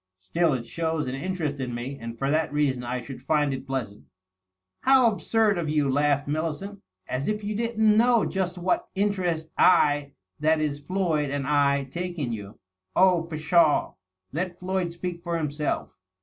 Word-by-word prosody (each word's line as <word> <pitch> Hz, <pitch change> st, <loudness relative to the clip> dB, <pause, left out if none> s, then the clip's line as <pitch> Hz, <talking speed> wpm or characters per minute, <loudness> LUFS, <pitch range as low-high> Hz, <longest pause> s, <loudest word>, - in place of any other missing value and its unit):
" 95 Hz, -, -61 dB
Still, 150 Hz, -, +1 dB
it 120 Hz, -3 st, -3 dB
shows 160 Hz, +2 st, -2 dB
an 125 Hz, -, -4 dB
interest 155 Hz, -1 st, -3 dB
in 125 Hz, -2 st, -3 dB
me, 125 Hz, +4 st, -4 dB
and 115 Hz, 0 st, -7 dB
for 135 Hz, +4 st, 0 dB
that 155 Hz, 0 st, +1 dB
reason 140 Hz, -4 st, 0 dB
I 125 Hz, +1 st, -3 dB
should 130 Hz, 0 st, -9 dB
find 145 Hz, 0 st, +1 dB
it 130 Hz, -, -6 dB
pleasant." 125 Hz, -7 st, -4 dB, 0.7 s
"How 260 Hz, -3 st, +5 dB
absurd 215 Hz, -2 st, +1 dB
of 160 Hz, -3 st, -2 dB
you!" 150 Hz, -2 st, +2 dB
laughed 145 Hz, 0 st, +2 dB
Millicent. 160 Hz, +6 st, -3 dB, 0.3 s
"As 130 Hz, +3 st, -2 dB
if 215 Hz, 0 st, -1 dB
you 210 Hz, +1 st, -2 dB
didn't 220 Hz, -1 st, +2 dB
know 235 Hz, -1 st, +4 dB
iust 185 Hz, -1 st, -2 dB
what 180 Hz, +1 st, 0 dB
interest 185 Hz, -5 st, 0 dB
I 145 Hz, -5 st, +4 dB
— 95 Hz, -, -31 dB
^that 160 Hz, +1 st, +3 dB
is, 150 Hz, -2 st, -1 dB
Floyd 160 Hz, -3 st, 0 dB
and 140 Hz, 0 st, -2 dB
I 140 Hz, -1 st, +2 dB
— -, -, -27 dB
^take 175 Hz, +2 st, -4 dB
in 140 Hz, -8 st, -2 dB
youl" 105 Hz, -2 st, -7 dB, 0.2 s
" 95 Hz, 0 st, -51 dB
Oh, 180 Hz, -3 st, +4 dB
pshaw 160 Hz, 0 st, +3 dB
I -, -, -32 dB, 0.4 s
let 175 Hz, +3 st, -3 dB
Floyd 185 Hz, -1 st, -2 dB
speak 170 Hz, 0 st, -5 dB
for 170 Hz, -1 st, -2 dB
himself." 150 Hz, -1 st, -2 dB
155 Hz, 190 wpm, -26 LUFS, 140-180 Hz, 0.7 s, How